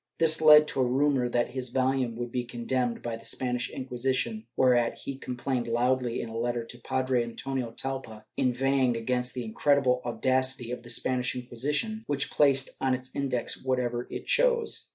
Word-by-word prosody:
This 160 -1 +5
led 150 -1 +8
to 135 - 0
a 125 - +2
rumor 135 -1 +2
that 120 0 0
his 130 -1 -2
volume 130 -2 0
would 120 0 -5
be 125 0 -1
condemned 120 0 -2
by 115 -1 -3
the 115 - -16
Spanish 125 -1 -1
Inquisition, 130 - -2
whereat 120 -2 +3
he 140 - -6
com 125 -2 -6
plained 125 -1 -2
loudly, 125 +1 0
in - - -6
a 110 - -8
letter 120 0 -1
to 120 +1 -11
Padre 130 0 0
Antonio 125 +1 -4
Talpa, 115 -3 -6
inveighing 130 -1 +1
against 125 +2 -2
the 125 -2 -3
incredible 130 +2 +2
audacity 130 +1 0
of 125 - -4
the 120 - -12
Spanish 125 +1 0
Inquisition, 145 - -3
which 140 -1 -1
placed 135 -2 +3
on 130 -1 +2
its 130 0 -9
Index 130 -4 -2
whatever 125 -2 -1
it - - -6
chose. 480 -2 +2
125 Hz, 175 wpm, -28 LUFS, 120-135 Hz, -, led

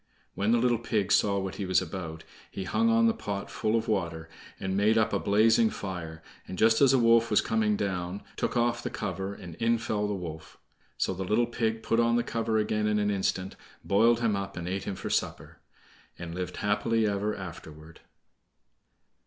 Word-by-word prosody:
When 100 +3 0
the 120 - +4
little 120 -1 +2
pig 105 -4 -1
saw 100 0 +3
what 95 -1 -4
he 100 - -3
was 95 - +4
about, 85 -3 -6 0.3
he 95 - -5
hung 225 - +1
on 230 0 +4
the 230 - +4
pot 100 - -5
full 110 +1 0
of 115 0 0
water, 85 -6 -2 0.3
and 95 0 -2
made 105 +3 +3
up 110 -2 +2
a 100 - +2
blazing 110 +5 +4
fire, 85 -6 -6 0.2
and, 95 - -7
just 110 +4 +4
as 140 - +7
the 135 - +4
wolf 115 -1 +4
was 105 - +4
coming 110 -2 +1
down, 95 -1 -3
took - - -2
off 120 0 +1
the - - -3
cover, 95 0 -4
and 90 -4 -10
in 115 +3 +2
fell 105 -2 -2
the 105 - -2
wolf; 80 -4 -8 0.4
so - - 0
the 95 +1 -4
little 110 +6 +2
pig 115 -1 -2
put 115 - +1
on 115 0 +3
the 120 - +2
cover 115 -1 -1
again 105 0 0
in 105 0 +1
an 105 0 +1
instant, 95 -1 -1 0.3
boiled 115 +4 +3
him 115 -3 +2
up, 100 -1 -5
and 85 0 -4
ate 95 +2 -3
him 95 - -3
for - - -5
supper, - - -2 0.6
and 85 -1 -7
lived 90 0 -5
happy 110 +2 +1
ever 105 +1 -1
afterward. 80 -3 -10
105 Hz, 200 wpm, -28 LUFS, 95-115 Hz, 0.6 s, as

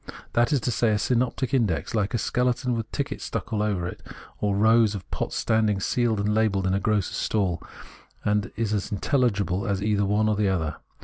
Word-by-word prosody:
It - - -8
is, - - -13 0.2
that 120 0 +3
is 145 - +3
to 125 - 0
say, 115 0 +2
a - - +2
synoptic 125 +3 0
index, 110 -11 +1
hke 105 +1 0
a - - +2
skeleton 125 +3 0
with 115 -1 -4
tickets 140 -1 -3
stuck - - -4
all 105 - +1
over 100 -5 0
it, 90 - -8 0.4
or 100 -1 0
hke - - 0
rows 110 -1 +4
of 95 - -7
pots - - -3
standing 110 -3 +1
sealed 115 +1 +1
and 105 +1 +1
labelled 105 -3 +1
in 95 - +1
a 100 - +2
grocer's 105 -2 0
stall; 95 -6 0 0.6
and 105 -1 +1
is 110 -1 -1
as 100 -2 -1
intelhgible 100 - 0
as 100 -1 -1
either 105 -1 +1
the 100 - +2
one 105 +2 +2
or 105 - +2
the 100 -1 +1
other. 80 -5 -1
105 Hz, 230 wpm, -25 LUFS, 100-115 Hz, 0.6 s, rows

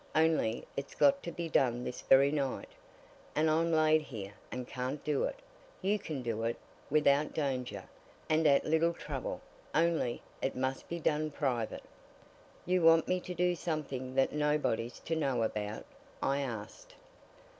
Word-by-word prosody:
"Only 155 -8 +2
it's 140 0 -5
got 280 0 +4
to 170 - -5
be 170 0 -4
done 125 -5 +2
this 125 - -5
very 140 +1 +5
night, 140 -3 -2 0.7
and 155 +1 +3
I'm 165 +2 +2
laid 155 -1 +4
here, 105 -9 -7 0.2
and 125 -1 -5
can't 130 +3 -4
do 150 -2 +1
it. - - -3 0.5
You 205 +2 +2
can 150 -8 -5
do 115 -2 -2
it, 115 +1 -1 0.3
without 150 0 +3
danger, 130 -4 -2 0.4
and 155 0 +3
at 140 -1 +4
little 160 +2 +3
trouble - - -5 0.3
only 165 -7 +1 0.2
it 135 - -1
must 130 +1 -2
be 170 - -2
done 155 -1 +1
private." 130 -6 -2 0.8
"You 180 0 +2
want 165 0 +6
me 185 0 +1
to 180 0 -7
do 180 +1 +2
something 140 -7 -3
that 135 0 +3
nobody's 150 -6 0
to 165 - -2
know 135 -7 +1
about?" 105 -1 -3 0.3
I 140 +1 +1
asked. 115 -6 -6
145 Hz, 155 wpm, -32 LUFS, 125-160 Hz, 0.8 s, want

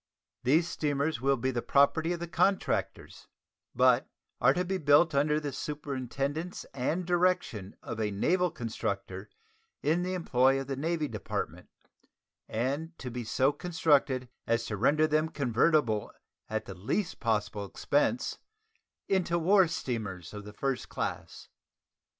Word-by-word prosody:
These 160 +7 +3
steamers 145 -3 -1
will 135 +1 +2
be 130 +2 0
the 120 -2 -2
property 150 +6 +3
of 175 - -2
the 170 - -4
contractors, 195 +3 -1 0.5
but - - +4 0.3
are - - +5
to 180 +1 0
be 190 +1 -1
built 155 +2 +5
"under 150 +2 +2
the 145 -2 -4
superintendence 140 +3 -4
and 150 +7 -1
direction 175 - 0
of 110 -1 -4
a 105 - +1
naval 180 - +1
constructor 105 - -4 0.5
in 160 +4 +2
the 185 +1 -2
employ 135 -5 +3
of 135 - -4
the 135 +1 -3
Navy 155 +2 -1
Department, 105 -6 -5 0.8
and 140 +9 -2
to 125 - -6
be 120 0 -4
so 130 +5 +2
constructed 145 -6 +1 0.2
as 115 0 +1
to 105 - -3
render 145 +9 +3
them 155 +1 +1
convertible 125 -4 +1 0.4
at - - -2
the - - -7
least 165 - -2
possible 105 -3 -1
expense 150 - 0 0.7
into 180 -3 +1
war 185 +2 +5
steamers 110 - -4
of 105 -1 -7
the 105 - -9
first 135 +3 -2
class." - - -5
140 Hz, 140 wpm, -30 LUFS, 120-165 Hz, 0.8 s, are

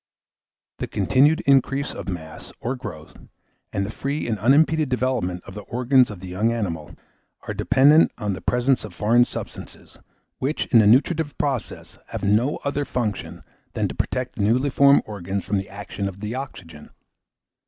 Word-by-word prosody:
The - - -3
continued 145 +5 +3
increase 140 +1 +2
of - - -7
mass, 80 -4 -7
or 125 +3 -2
growth, 95 -12 -9 0.5
and 100 - -1
the 105 - -5
free 140 +5 -3
and 110 -3 -2
unimpeded 150 +6 +3
development 120 -9 -1
of - - -11
the 105 - -7
organs 125 +4 +2
in 105 - -7
the 95 +1 -9
young 100 +6 0
animal, 85 -10 -4 0.5
are - - -2
dependent 145 +5 +5
on 105 -4 -2
the 95 - -7
presence 125 +2 +1
of 105 -5 -9
foreign 120 +5 +4
substances, - - -9 0.4
which, 140 +4 -1
in 115 - +8
the 105 - +5
nutritive 145 +6 +2
process, 135 -5 -3
have - - -6
no 110 +8 +2
other 145 0 -1
function 115 -7 -4 0.3
than - - 0
to - - -5
protect 125 0 -2
the - - -2
newly 125 +7 +2
formed 140 +2 +5
organs 100 -2 -4
from 100 0 0
the 95 - -7
action 100 0 -5
of 95 0 -7
the 105 +2 -4
oxygen. 100 - -8
115 Hz, 170 wpm, -23 LUFS, 100-135 Hz, 0.5 s, in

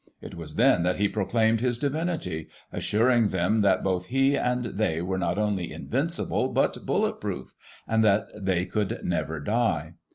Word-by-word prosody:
It - - -10
was 80 -3 -8
then 120 -5 +4
that 90 +1 +1
he 100 - +2
proclaimed 110 +2 +1
his 125 -1 +1
divinity 145 - -2
— - - -31
^assuring 115 0 +2
them 95 +5 +1
that 95 -3 +3
both 90 -2 -1
he 135 +2 +2
and 125 -1 0
they 100 -7 -1
were 95 +2 -2
not 90 0 -1
only 105 -4 -1
invincible, - - -1
but - - 0
bullet - - 0
proof, - - -5 0.3
and 110 0 +2
that 105 0 +3
they 95 -3 0
could 105 -1 -2
never 80 0 -1
die. 85 -4 0
105 Hz, 170 wpm, -26 LUFS, 90-120 Hz, 0.3 s, then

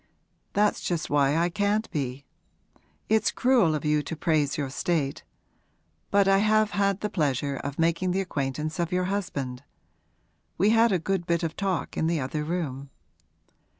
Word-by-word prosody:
'That's 210 0 +2
just 170 -3 -2
why 145 +1 +3
I 170 +1 +3
can't 205 +4 0
be. 135 -2 -3 0.8
It's 220 0 +3
cruel 240 -11 +3
of 150 - -4
you 150 0 +2
to 155 +3 -5
praise 155 -3 +1
your 140 -3 -3
state. 145 -2 -1 0.9
But 200 -1 +3
I 195 0 +5
have 215 0 +3
had 200 -1 +1
the 210 - -1
pleasure 140 -4 0
of 140 +1 -5
making 170 +3 +1
the 190 +2 +1
acquaintance 150 -2 -3
of 170 +1 -1
your 180 0 +1
husband. 135 -10 -3 1.0
We 200 +4 +4
had 230 0 +4
a 190 - +3
good 175 +1 -2
bit 170 0 +1
of 165 0 -2
talk 195 -3 -2
in 160 - +1
the 165 -1 +1
other 140 +3 -3
room.' 150 -5 -3
170 Hz, 165 wpm, -26 LUFS, 145-195 Hz, 1.0 s, I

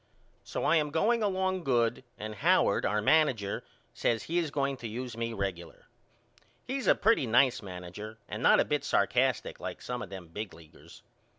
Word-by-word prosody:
So - - -4
I 165 - +4
am 150 -1 +1
going 220 +10 +2
along 190 -2 0
good 120 -3 +1
and 110 +1 -6
Howard 105 - +3
our 105 0 0
manager 125 -9 +2 0.3
says 115 -1 0
he 170 +2 0
is 165 -3 -1
going 140 -1 -1
to 120 - -6
use 120 +2 -5
me 115 0 -2
regular. 95 -5 -5 0.8
He's 260 -4 -3
a - - +6
pretty 215 - +3
nice 125 +2 +4
manager 95 +3 -8
and - - -5
not - - +6
a - - +3
bit 150 -1 0
sarkastic 130 -3 +1
like - - -6
some 125 0 -5
of 100 - -6
them 95 -4 -9
big 105 +4 -6
leaguers. 80 -2 -16
125 Hz, 180 wpm, -30 LUFS, 105-155 Hz, 0.8 s, a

